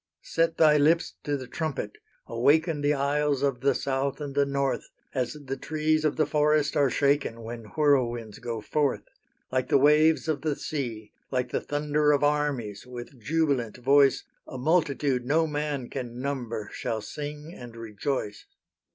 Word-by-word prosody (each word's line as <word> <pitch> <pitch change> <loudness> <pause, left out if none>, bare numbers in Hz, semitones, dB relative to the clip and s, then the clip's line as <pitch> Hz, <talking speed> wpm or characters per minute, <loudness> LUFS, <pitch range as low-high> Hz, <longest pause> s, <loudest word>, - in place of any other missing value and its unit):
Set 165 0 0
thy 150 -2 +6
lips 160 +4 +3
to 145 -1 -1
the 130 - -7
trumpet, 160 - -4 0.3
awaken 160 +1 +2
The 145 +1 +2
isles 145 0 +1
of 135 -3 0
the 140 +1 +3
South 135 +1 -1
and 145 -2 -5
the 140 0 +2
North, 140 -1 -1 0.2
As 125 -2 -1
the 135 0 -3
trees 155 +1 0
of 155 -2 +1
the 155 - +2
forest 150 0 +2
are 140 -2 +4
shaken 140 -4 +1
When 115 0 -7
whirlwinds 120 -7 +1
go 115 -2 -4
forth: 145 +4 0 0.5
Like 130 0 0
the - - +5
waves 150 +4 +4
of 150 -3 -1
the 150 -1 0
sea, 115 -10 -5 0.2
like 125 -1 -1
the - - -1
thunder 150 0 +1
Of 145 - +1
armies, 145 -8 0
with 125 +1 -9
jubilant 140 -5 0
voice, 135 +2 +4 0.2
A 130 - -7
multitude 140 -3 +1
no 155 +6 +2
man 150 -4 -2
can 120 -1 -6
number 120 -6 -4
Shall 110 -1 -3
sing 150 +6 -7
and 120 -7 -10
rejoice. 110 -1 -4
140 Hz, 160 wpm, -27 LUFS, 125-150 Hz, 0.5 s, thy